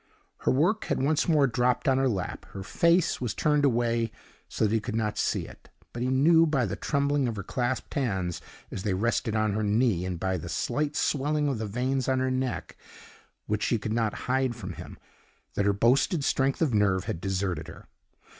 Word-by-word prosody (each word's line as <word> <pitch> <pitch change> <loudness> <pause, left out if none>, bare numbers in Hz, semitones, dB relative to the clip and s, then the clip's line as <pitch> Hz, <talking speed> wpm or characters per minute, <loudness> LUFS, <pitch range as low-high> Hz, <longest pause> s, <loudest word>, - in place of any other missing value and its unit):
Her - - 0
work 175 - +2
had - - -1
once 145 +3 +1
more 150 -4 +5
dropped 125 +1 +1
on 135 -1 +4
her 135 -1 +2
lap, 95 -6 -4
her 95 - -6
face 170 - +2
was 115 -6 -2
turned 150 -1 +2
away 115 -3 +1 0.4
so - - 0
that 105 - +1
he 115 - +3
could 110 +1 -5
not 105 -2 -1
see - - 0
it; - - -14 0.2
but 120 - -5
he 125 - 0
knew 160 +6 +5
by 140 -6 +1
the - - -3
trembling 140 -2 0
of 115 - -3
her 100 - -5
clasped 125 +4 -2
hands, 95 - -1 0.3
as - - -4
they 95 -1 0
rested 110 +1 0
on 110 -1 +1
her 110 - -1
knee, 105 -3 +2
and 90 -2 -3
by 95 0 -1
the 85 +1 -7
slight 150 - -1
swelling 150 +1 +1
of 135 -5 -1
the 110 - -3
veins 130 +5 -1
on 130 - +2
her 130 0 0
neck 130 -1 -3 0.7
which 105 0 -1
she 120 - +1
could 110 +1 -3
not 115 -2 -1
hide 130 -1 +1
from 105 -6 -7
him, - - -10 0.6
that 100 - 0
her 100 - +4
boasted 130 - +2
strength 135 +2 +1
of 140 -7 +1
nerve 95 -3 +2
had 85 - -4
deserted 95 -4 -2
her. - - -12
120 Hz, 210 wpm, -27 LUFS, 105-135 Hz, 0.7 s, more